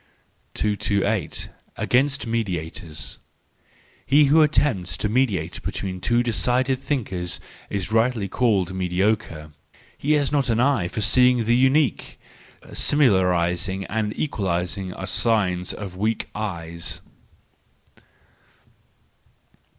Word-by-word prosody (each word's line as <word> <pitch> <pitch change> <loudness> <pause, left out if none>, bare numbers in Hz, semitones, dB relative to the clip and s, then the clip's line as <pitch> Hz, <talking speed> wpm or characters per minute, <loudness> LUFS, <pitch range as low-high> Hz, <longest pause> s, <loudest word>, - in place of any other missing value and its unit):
228. 105 -2 0 0.3
Against 140 +3 +1
Mediators 85 - -4 0.9
.—He 145 +2 +6
who 160 +2 +6
attempts 120 - +1
to 105 - -1
mediate 115 -3 0
between 95 -2 -4
two 120 +5 +2
decided 125 +4 +1
thinkers 95 -12 -3 0.3
is 100 0 -3
rightly 115 -2 +2
called 100 -4 +1
mediocre: 90 -4 -1 0.4
he 150 +2 0
has 145 -2 +1
not 140 -3 +1
an 115 0 +2
eye 125 -8 +2
for 110 - -4
seeing 125 +3 +4
the 115 +2 +2
unique; 130 0 +2 0.5
similarising 95 - +2
and 110 0 -1
equalising 95 - -2
are 95 - -5
signs 95 -3 +1
of 100 -3 -7
weak 110 +4 -1
eyes. 85 -6 -4
105 Hz, 100 wpm, -23 LUFS, 90-125 Hz, 0.9 s, He